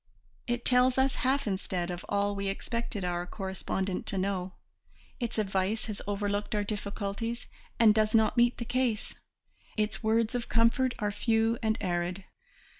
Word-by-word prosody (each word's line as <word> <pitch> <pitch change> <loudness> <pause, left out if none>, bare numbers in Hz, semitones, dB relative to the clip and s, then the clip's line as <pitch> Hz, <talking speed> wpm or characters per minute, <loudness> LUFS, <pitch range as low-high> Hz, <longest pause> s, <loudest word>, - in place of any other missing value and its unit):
It 240 0 -1
tells 250 +1 +5
us 265 0 +3
half 270 +2 +2
instead 185 -3 -2
of 175 0 -5
all 200 0 +1
we 200 0 -2
expected 210 0 -3
our 175 0 -2
correspondent 190 0 -3
to 195 - -1
know, 185 -1 -1 0.7
its 235 -2 -3
advice 195 +1 0
has 210 -2 -4
overlooked 205 +1 -1
our 205 - +1
difficulties 205 +2 -3 0.3
and 220 -2 +7
does 215 0 +2
not 220 -1 +4
meet 240 0 +4
the 235 - -4
case, 245 -3 0 0.6
its 215 0 0
words 225 +1 +2
of 245 -2 -3
comfort 235 +3 +3
are 210 -2 -1
few 225 +2 +1
and 220 0 +1
arid. 180 0 -1
215 Hz, 155 wpm, -30 LUFS, 195-230 Hz, 0.7 s, and